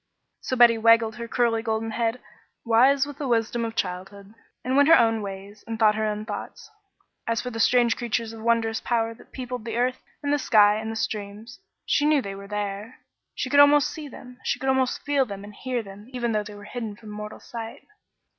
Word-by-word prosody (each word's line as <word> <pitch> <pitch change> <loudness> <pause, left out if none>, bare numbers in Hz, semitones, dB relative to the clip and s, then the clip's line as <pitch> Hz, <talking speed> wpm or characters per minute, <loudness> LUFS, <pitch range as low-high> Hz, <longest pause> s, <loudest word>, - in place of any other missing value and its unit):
So 255 - -3
Betty 235 -2 +6
wagged 230 0 +5
her 235 - -6
curly 230 -1 +1
golden 225 0 -2
head, 230 +2 -1 0.5
wise 260 +5 +4
with 290 -1 -10
the 285 - -3
wisdom 235 0 0
of 225 0 -4
childhood, 195 +2 -5 0.3
and 255 +1 0
went 285 +2 +5
her 330 - +9
own 225 -2 +2
ways 200 +1 -8
and 225 -1 -4
thought 215 -1 +5
her 215 0 -1
own 210 0 -3
thoughts. 215 - -7 0.6
As 230 0 0
for 250 +1 -4
the 225 - -6
strange 240 0 +4
creatures 230 -1 -2
of 225 - -10
wondrous 225 0 +1
power 230 -1 0
that 225 - -19
peopled 250 -2 -6
the 230 0 -4
earth, 250 +1 0 0.2
and 285 0 +1
the 290 - +2
sky, 210 -4 +5
and 220 +1 -4
the - - -5
streams, 215 +1 -5 0.3
she 290 - +2
knew 305 -1 +4
they 200 -6 -5
were 200 0 -10
there. 210 +3 -5 0.3
She - - -2
could 285 - +5
almost 285 0 +6
see 310 -2 -7
them, 250 -2 -12 0.2
could 265 - -4
almost 265 -1 +1
feel 285 -2 +2
them 200 -1 -7
and 205 0 -11
hear 250 +1 -3
them, 200 +2 -12
even 240 -2 -1
though 215 -1 +1
they 210 0 -9
were 205 - -11
hidden 220 -1 -6
from 215 0 -12
mortal 210 0 -7
sight. 230 -1 -8
225 Hz, 215 wpm, -25 LUFS, 210-250 Hz, 0.6 s, her